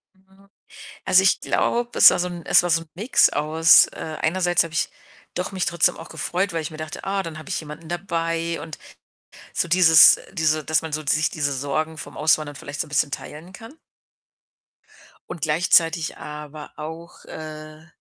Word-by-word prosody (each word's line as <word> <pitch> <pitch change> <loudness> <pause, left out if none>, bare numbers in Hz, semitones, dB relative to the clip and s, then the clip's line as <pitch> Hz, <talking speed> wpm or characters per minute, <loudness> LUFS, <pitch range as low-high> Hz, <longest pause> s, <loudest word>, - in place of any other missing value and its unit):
Mhm. 190 +1 -26 0.6
Also, 190 - +4
ich 195 +1 +2
glaube, 240 0 -1
es - - +9
war - - -1
so 180 0 -1
'n 175 -2 -9
es - - +5
war 175 - -2
so 165 0 +2
'n 165 - -18
Mix 215 +9 +3
aus, 160 +2 +4
äh 155 -1 -7
einerseits 175 0 +1
habe 165 -1 -10
ich - - -1 0.4
doch 180 +2 -4
mich 185 -2 -2
trotzdem 170 -1 +2
auch 165 - -10
gefreut, 185 +1 -3
weil 165 - -3
ich 150 - -6
mir 155 - -11
dachte, 155 -1 -8
ah, 195 0 -2
dann 165 -3 -8
habe 155 - -11
ich - - -2
jemanden 155 +1 -11
dabei 165 -1 -3
und 160 -1 -9 0.8
so - - -1
dieses 165 -3 +7
diese 155 -4 0
dass 155 +2 +1
man 160 -1 -7
so 155 +1 -3
sich 155 +2 +2
diese 145 -3 -2
Sorgen 150 +4 -3
vom - - -9
Auswandern 150 -1 0
vielleicht 140 +1 -8
so - - -1
'n - - -17
bisschen 145 0 0
teilen 160 +7 -9
kann. 225 +8 -13 1.6
Und 170 - -8
gleichzeitig 165 +1 +1
aber 150 0 -10
auch, 160 +3 -10
äh 155 0 -10
160 Hz, 185 wpm, -22 LUFS, 155-175 Hz, 1.6 s, es